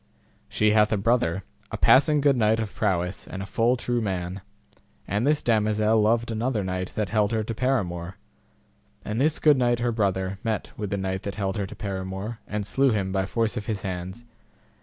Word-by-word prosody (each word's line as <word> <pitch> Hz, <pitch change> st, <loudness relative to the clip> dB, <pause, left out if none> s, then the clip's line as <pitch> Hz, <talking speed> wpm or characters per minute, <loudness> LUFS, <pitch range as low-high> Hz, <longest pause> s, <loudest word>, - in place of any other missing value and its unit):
She 105 Hz, 0 st, +2 dB
hath 105 Hz, 0 st, +4 dB
a 110 Hz, -, +2 dB
brother, 100 Hz, -4 st, +1 dB, 0.3 s
a -, -, -4 dB
passing 145 Hz, +2 st, +5 dB
good 140 Hz, -1 st, +4 dB
knight 110 Hz, -2 st, +2 dB
of 110 Hz, -2 st, -3 dB
prowess 90 Hz, +1 st, -1 dB
and 95 Hz, 0 st, -6 dB
a -, -, -6 dB
full 120 Hz, +5 st, +1 dB
true 120 Hz, 0 st, -1 dB
man; 95 Hz, -2 st, -3 dB, 0.7 s
and 105 Hz, +7 st, 0 dB
this 150 Hz, 0 st, +2 dB
damosel 110 Hz, -1 st, +2 dB
loved 115 Hz, +2 st, +2 dB
another 115 Hz, -1 st, -1 dB
knight 90 Hz, -1 st, -3 dB
that 105 Hz, -3 st, -1 dB
held 105 Hz, -1 st, +1 dB
her 110 Hz, -1 st, 0 dB
to 115 Hz, -, -4 dB
paramour, 95 Hz, -8 st, -1 dB, 0.9 s
and 110 Hz, +4 st, -2 dB
this 155 Hz, +2 st, +2 dB
good 150 Hz, -3 st, +5 dB
knight 120 Hz, -1 st, +2 dB
her 120 Hz, +1 st, 0 dB
brother 95 Hz, -3 st, -1 dB
met 110 Hz, -3 st, -2 dB
with 105 Hz, -2 st, -4 dB
the 100 Hz, -, -1 dB
knight 95 Hz, -1 st, -2 dB
that 100 Hz, -, -5 dB
held 100 Hz, -2 st, -2 dB
her 100 Hz, -2 st, -2 dB
to -, -, -10 dB
paramour, 95 Hz, +3 st, -5 dB
and 105 Hz, -1 st, -3 dB
slew 135 Hz, +6 st, +2 dB
him 100 Hz, -5 st, 0 dB
by 95 Hz, 0 st, 0 dB
force 115 Hz, +1 st, -1 dB
of 105 Hz, -3 st, -5 dB
his 110 Hz, -3 st, -3 dB
hands. 95 Hz, +4 st, -5 dB
105 Hz, 200 wpm, -25 LUFS, 95-115 Hz, 0.9 s, passing